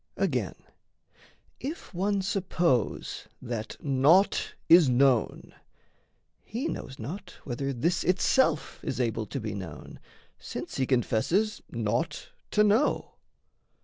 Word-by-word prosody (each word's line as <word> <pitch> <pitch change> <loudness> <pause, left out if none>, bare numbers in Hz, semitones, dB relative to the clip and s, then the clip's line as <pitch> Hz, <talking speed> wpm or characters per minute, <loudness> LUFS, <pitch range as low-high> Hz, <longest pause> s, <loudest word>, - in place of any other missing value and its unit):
Again, - - 0 1.0
if 290 - -6
one 195 +2 0
suppose 175 - 0
That 115 -2 -5
naught 145 +8 +3
is 165 -4 +7
known, 125 -2 +2 0.9
he 245 +8 -3
knows 135 -1 -5
not 180 - -7
whether 135 +1 -3
this 155 +7 0
Itself 180 - +2
is 130 - -3
able 115 -3 -1
to 135 - -4
be 105 -3 -4
known, 85 -9 -8 0.4
since - - -6
he 130 - +1
Confesses 165 - +1
naught 120 +8 -2 0.2
to 210 - +4
know. 215 +8 +2
140 Hz, 110 wpm, -28 LUFS, 120-190 Hz, 1.0 s, is